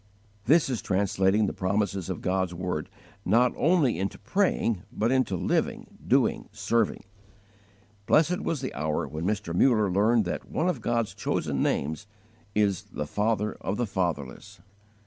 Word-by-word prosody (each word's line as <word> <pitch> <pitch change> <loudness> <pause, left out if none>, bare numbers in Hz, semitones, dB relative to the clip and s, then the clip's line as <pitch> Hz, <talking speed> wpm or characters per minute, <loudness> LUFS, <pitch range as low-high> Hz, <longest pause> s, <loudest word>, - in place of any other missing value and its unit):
This 160 +2 +4
is 125 -4 -2
translating 95 +1 +2
the - - -2
promises 95 -1 -1
of 90 - -4
God's 95 -1 0
word, 90 -3 -3 0.3
not 120 +6 +3
only 155 - +2
into 100 +1 -2
praying, 115 - 0
but 115 +3 0
into 130 -7 +1
living, - - -2
doing, - - +2
serving. 105 +1 0 1.0
Blessed 165 +3 +3
was 160 -5 -2
the 130 - -4
hour 75 0 -1
when 80 +2 -5
Mr. 105 -4 -2
Muller 110 0 +3
learned 110 +3 +3
that 85 - -4
one 170 - 0
of 165 -10 -1
God's 115 -1 0
chosen - - -2
names 80 +8 -1 0.5
is 100 -3 +2
"the 75 - -3
Father 105 +5 0
of 100 - -2
the 120 - 0
fatherless"! 85 - -3
105 Hz, 145 wpm, -27 LUFS, 95-120 Hz, 1.0 s, This